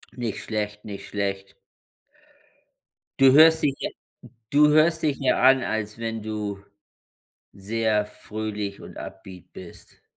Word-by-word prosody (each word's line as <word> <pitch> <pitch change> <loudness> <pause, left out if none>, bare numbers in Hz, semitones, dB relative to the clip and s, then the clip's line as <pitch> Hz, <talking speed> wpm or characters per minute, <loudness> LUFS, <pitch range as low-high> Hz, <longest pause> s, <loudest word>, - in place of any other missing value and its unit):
Nicht 120 -4 -4
schlecht, 105 -1 -4
nicht 100 -2 -8
schlecht. 100 -1 -4 1.6
Du 135 -1 +7
hörst 160 +2 +7
dich 140 -2 +1
ja - - -3 0.6
du 150 +1 +5
hörst 160 +1 +3
dich 145 -2 +1
ja 135 - +1
an, 130 0 +5
als 105 -1 -3
wenn 115 -1 -4
du 105 -2 -4 0.9
sehr 105 +1 -1
fröhlich 105 -1 -6
und - - -12
upbeat 95 -2 -11
bist. 90 -2 -13
110 Hz, 125 wpm, -24 LUFS, 105-135 Hz, 1.6 s, Du